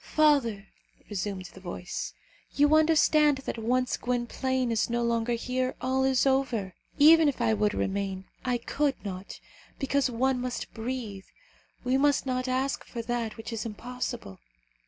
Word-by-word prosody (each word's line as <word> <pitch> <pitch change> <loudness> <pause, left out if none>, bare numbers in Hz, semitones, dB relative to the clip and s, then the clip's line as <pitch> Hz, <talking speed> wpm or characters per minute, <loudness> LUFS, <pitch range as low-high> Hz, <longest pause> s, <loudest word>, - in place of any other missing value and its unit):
"Father!" 275 -10 +3 0.5
resumed 195 -1 -3
the - - -12
voice, 180 -1 -5 0.4
"you 290 +1 +4
understand 310 -2 +5
that - - -3
once 250 +3 +1
Gwynplaine 250 +1 -1
is 225 0 +1
no 235 0 0
longer 235 0 +1
here, 255 +2 -1
all 260 +1 +1
is 265 -1 +3
over. 255 -8 +1 0.2
Even 315 +1 +7
if 275 - -4
I 230 -2 +2
would 210 0 +1
remain, 195 -1 -2 0.2
I 250 -1 +1
could 280 +3 0
not, 190 -1 -6 0.4
because 275 -1 +1
one 250 +1 +1
must 250 -1 -4
breathe. 225 -4 -5 0.6
We 255 +1 +2
must 285 0 +3
not 255 0 -1
ask 260 +2 -1
for 235 -2 -6
that 235 -2 -2
which 225 +1 -6
is 225 - -3
impossible. 230 - -5
250 Hz, 150 wpm, -28 LUFS, 220-265 Hz, 0.6 s, Even